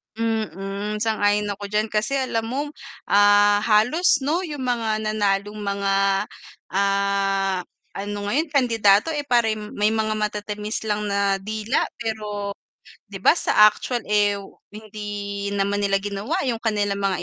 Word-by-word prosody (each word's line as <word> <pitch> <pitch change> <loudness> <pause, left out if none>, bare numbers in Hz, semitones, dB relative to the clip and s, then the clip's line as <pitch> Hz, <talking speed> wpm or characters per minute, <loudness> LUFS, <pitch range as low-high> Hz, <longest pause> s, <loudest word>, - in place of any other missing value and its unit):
Mhm, 210 -2 -3
sang-ayon 205 -2 +1
ako 200 0 -6
diyan. 210 +1 -1
Kasi 215 +6 0
alam 230 -4 -1
mo, 285 +5 -3 0.4
ah, 205 0 +5
halos, 265 +7 +3
'no, 315 +5 +1
'yung 290 -4 -5
mga 225 -3 -1
nanalong 205 -1 -1
mga, 200 -1 -1 0.8
ah, 195 -1 +1 0.4
ano 205 +1 -4
ngayon, 300 +10 0
kandidato, 230 -2 +3
eh, 295 -1 -2
parang 220 -3 +1
may 210 +1 +2
mga 220 -1 0
matatamis 210 0 -3
lang 210 0 -1
na 200 -1 +1
dila, 215 +4 -1 0.2
pero 210 -3 -4 0.6
'di - - -6
ba - - +5
sa 210 - +5
actual, 240 +2 -4
eh, 205 -1 +2 0.3
hindi 205 -1 -6
naman 200 0 0
nila 195 -1 +2
ginawa 205 - -3
'yung 230 -2 -2
kanilang 205 -3 0
mga 190 -2 0
210 Hz, 135 wpm, -23 LUFS, 200-220 Hz, 0.8 s, ah